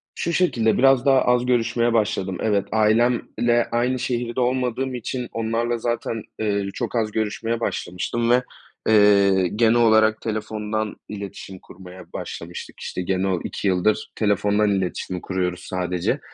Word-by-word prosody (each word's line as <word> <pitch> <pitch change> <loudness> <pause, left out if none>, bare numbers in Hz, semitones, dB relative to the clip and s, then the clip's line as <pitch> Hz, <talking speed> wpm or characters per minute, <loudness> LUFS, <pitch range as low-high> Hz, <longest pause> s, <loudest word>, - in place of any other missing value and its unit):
Şu 170 - -2
şekilde, 120 -11 +2
biraz 135 0 +4
daha 135 -1 +5
az 125 0 +2
görüşmeye 120 -1 +1
başladım. 100 -4 0
Evet, 100 -2 +1
ailemle 120 +2 +2
aynı 125 +2 +1
şehirde 120 0 -2
olmadığım 125 +1 0
için 125 +1 -4
onlarla 115 +1 -1
zaten, 115 -1 -2 0.2
eee, 100 -2 -1
çok - - -3
az 110 -2 0
görüşmeye 110 +2 -2
başlamıştım 115 +4 -2
ve, 125 +1 +4 0.5
eee, 100 -3 +5
genel 115 +1 +4
olarak 110 -2 +4
telefondan 110 -1 -3
iletişim 100 -2 -8
kurmaya 90 0 -13
başlamıştık. 85 +1 -7
İşte 90 - -4
gene 95 +1 0
o 90 -3 0
2 100 - -2
yıldır 95 +4 +1
telefondan 105 0 +2
iletişim 95 -1 -2
kuruyoruz 90 -1 -2
sadece. 90 -1 -2
110 Hz, 135 wpm, -22 LUFS, 100-120 Hz, 0.5 s, daha